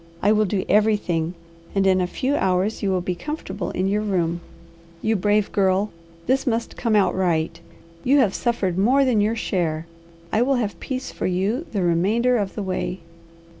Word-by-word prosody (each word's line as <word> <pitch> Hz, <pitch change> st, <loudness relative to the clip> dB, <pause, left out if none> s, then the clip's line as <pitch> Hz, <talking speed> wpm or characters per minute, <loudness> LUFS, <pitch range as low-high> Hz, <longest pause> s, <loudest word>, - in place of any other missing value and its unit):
I 205 Hz, -, +5 dB
will 215 Hz, 0 st, +3 dB
do 190 Hz, 0 st, -1 dB
everything, 190 Hz, -5 st, +2 dB, 0.4 s
and 195 Hz, -1 st, +2 dB
in 185 Hz, -1 st, +4 dB
a 180 Hz, -, 0 dB
few 265 Hz, +9 st, -1 dB
hours 190 Hz, -1 st, +1 dB
you 200 Hz, -, 0 dB
will 185 Hz, -1 st, +1 dB
be 180 Hz, +1 st, -2 dB
comfortable 195 Hz, -, -5 dB
in 185 Hz, +1 st, -1 dB
your 205 Hz, +2 st, +1 dB
room. 175 Hz, -5 st, -1 dB, 0.6 s
You 220 Hz, 0 st, +2 dB
brave 205 Hz, +1 st, +1 dB
girl! 195 Hz, +1 st, +2 dB, 0.3 s
This 265 Hz, +2 st, +1 dB
must 230 Hz, -1 st, -1 dB
come 230 Hz, -3 st, 0 dB
out 190 Hz, -4 st, +3 dB
right! 170 Hz, -2 st, 0 dB, 0.4 s
You 275 Hz, +3 st, +4 dB
have 225 Hz, -9 st, +3 dB
suffered 190 Hz, -7 st, -1 dB
more 260 Hz, +7 st, +4 dB
than 235 Hz, -5 st, +3 dB
your 215 Hz, +2 st, +1 dB
share. 165 Hz, -7 st, -1 dB, 0.5 s
I 220 Hz, -, +2 dB
will 270 Hz, +2 st, +3 dB
have 205 Hz, -8 st, -2 dB
peace 260 Hz, -1 st, -4 dB
for -, -, -3 dB
you 200 Hz, -, -1 dB
the 200 Hz, -4 st, -1 dB
remainder 210 Hz, +9 st, +2 dB
of 200 Hz, -3 st, -2 dB
the 210 Hz, -, -3 dB
way." 185 Hz, 0 st, -3 dB
200 Hz, 185 wpm, -23 LUFS, 185-225 Hz, 0.6 s, I